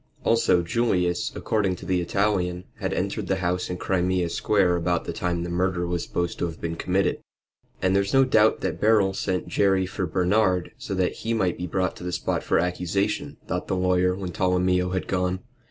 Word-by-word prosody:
Also 115 -6 +3
Julius, 90 -2 0
according 100 -4 0
to - - -11
the 90 -1 +1
Italian, 90 -1 0 0.2
had - - -2
entered - - -2
the 95 - +1
house 90 -1 -1
in 90 - -3
Crimea 90 -1 0
Square 95 0 +2
about 85 0 0
the - - -4
time 85 -1 -2
the 85 - -4
murder 90 0 0
was 85 -1 -1
supposed 85 -1 -3
to - - +1
have 80 -1 -6
been 85 0 -3
committed. 95 +3 0 0.6
"And 95 +1 +3
there's 100 0 +1
no 135 0 +5
doubt 110 -4 +3
that - - -3
Beryl 105 -3 +4
sent 95 -1 -2
Jerry 95 -2 +2
for 95 0 -3
Bernard, 90 +1 +1
so 95 - -4
that 95 -1 0
he 115 0 -2
might 95 -6 +1
be 90 - -3
brought 95 +2 -1
to - - -10
the 90 - -3
spot - - -1
for - - +1
accusation," 90 +4 -1
thought - - -3
the - - 0
lawyer 90 0 +2
when 95 -2 -5
Tolomeo 90 0 +1
had 95 0 -2
gone. 90 0 -1
90 Hz, 200 wpm, -25 LUFS, 90-95 Hz, 0.6 s, no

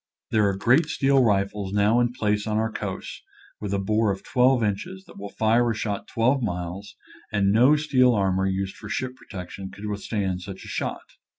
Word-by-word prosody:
There 105 -2 +3
are 100 - -1
great 130 +10 +3
steel 135 -3 +3
rifles 100 -2 0
now 105 +3 +3
in 120 0 +2
place 105 -3 -1
on 105 0 0
our 110 0 0
coasts, 95 -3 -6 0.4
with 105 -2 -4
a 100 - +1
bore 105 +2 +1
of 95 - -5
twelve 125 -1 +3
inches, 175 - -3
that - - -14
will 100 0 -6
fire 115 +3 +2
a 115 - -1
shot 105 -1 -3
twelve 130 +4 +1
miles, 90 -1 -4 0.4
and 100 -2 +2
no 125 +8 +5
steel 130 -5 +3
armor 95 -1 +1
used 95 0 -2
for 105 - -10
ship 130 +2 -3
protection 95 -4 -8
could 100 +2 -10
withstand 100 -2 -2
such 95 0 -8
a - - -10
shot. - - -3
105 Hz, 195 wpm, -25 LUFS, 100-120 Hz, 0.4 s, no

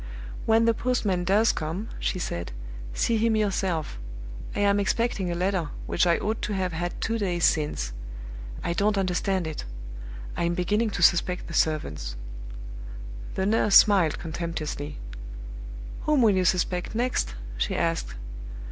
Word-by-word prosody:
"When 225 +1 +5
the 230 - +5
postman 210 -7 +1
does 210 +5 +5
come," 165 +8 -3
she - - 0
said, 85 - -3 0.4
"see 230 - +2
him 225 0 +3
yourself. 190 - 0 0.6
I - - +1
am 200 0 +4
expecting 200 -2 +1
a 170 - -1
letter 180 -2 +1 0.2
which 175 - +2
I 170 - +5
ought 220 +1 -1
to 210 - -1
have 185 -2 0
had 175 +2 -2
two 225 0 0
days 175 -4 0
since. 105 - +1 0.7
I 170 - 0
don't 205 +4 +2
understand 190 -1 +1
it. 155 -1 -4 0.7
I'm 170 0 +1
beginning 210 +6 +2
to 195 -4 -1
suspect 180 +2 +4
the 170 - -7
servants." 75 - 0 1.2
The 190 - +1
nurse 210 -1 +4
smiled 190 -7 +7
contemptuously. 160 -3 -4 1.1
"Whom 300 -4 +4
will 215 -3 +6
you 185 -1 +2
suspect 180 +2 +1
next?" 235 - 0 0.2
she - - +1
asked. 165 - 0
185 Hz, 145 wpm, -27 LUFS, 165-210 Hz, 1.2 s, smiled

